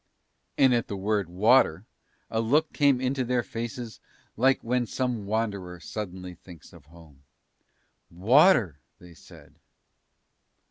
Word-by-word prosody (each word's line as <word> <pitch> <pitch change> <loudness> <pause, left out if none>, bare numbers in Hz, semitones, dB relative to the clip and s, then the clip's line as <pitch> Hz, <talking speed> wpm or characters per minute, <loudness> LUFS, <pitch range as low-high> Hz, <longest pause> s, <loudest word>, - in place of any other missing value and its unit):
And 130 -2 +4
at 120 -1 0
the 100 - -5
word 100 -2 -1
water 100 -1 +3 0.5
a 110 - 0
look 150 +8 +1
came 140 -4 +3
into 130 +1 -1
their 125 0 -1
faces 115 0 -7 0.4
like 130 +4 +2
when 120 0 -1
some 120 -6 -3
wanderer 100 -5 -3
suddenly 90 0 -7
thinks 85 -1 -16
of 85 -4 -16
home. 80 -3 -18 0.9
"Water!" 110 - +3 0.2
they 90 -1 -16
said. - - -18
110 Hz, 125 wpm, -26 LUFS, 90-125 Hz, 0.9 s, And